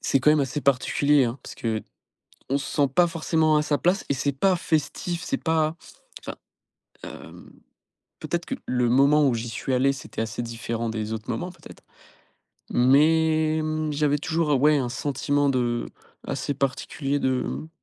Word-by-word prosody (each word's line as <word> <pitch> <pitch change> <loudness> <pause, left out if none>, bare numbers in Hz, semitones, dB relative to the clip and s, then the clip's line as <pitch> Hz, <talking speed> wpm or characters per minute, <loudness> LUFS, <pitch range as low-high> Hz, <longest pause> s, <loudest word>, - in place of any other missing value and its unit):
C'est 135 - +1
quand 150 - +5
même 155 -1 +4
assez 140 +2 -2
particulier, 140 +1 +3
hein, 120 +3 -3
parce - - -9
qu'on 110 -2 -5 0.5
se 135 - -5
sent 145 -2 +3
pas 175 +3 +5
forcément 160 -2 +1
à 150 - +3
sa 150 -1 0
place 180 +4 +1
et 140 - +1
c'est 140 +2 -1
pas 185 +7 +2
festif, 170 +2 -2
c'est 275 +9 -3
pas 160 0 +1 0.4
enfin, - - -7 0.7
hem, - - -11 0.7
peut-être 175 0 -3
que 265 - -3
le 125 -1 +1
moment 140 +4 +5
où 130 - +2
j'y 115 +1 -4
suis 115 +4 -3
allé, 130 +2 +3
c'était 135 -4 -6
assez 110 +1 -3
différent 115 0 -4
des 110 -1 -4
autres 110 0 -6
moments 180 +1 -3
peut-être. 170 -3 -15 0.9
Mais, 155 +4 +3
mmh, 155 0 -2
j'avais 145 0 +1
toujours 150 -2 0
ouais 150 +2 +5
un 130 -3 -1
sentiment 145 +2 0
de 120 -2 0 0.4
assez 145 - -2
particulier 140 +1 -2
de 130 -2 0
mmh 155 - -5
145 Hz, 170 wpm, -25 LUFS, 125-155 Hz, 0.9 s, quand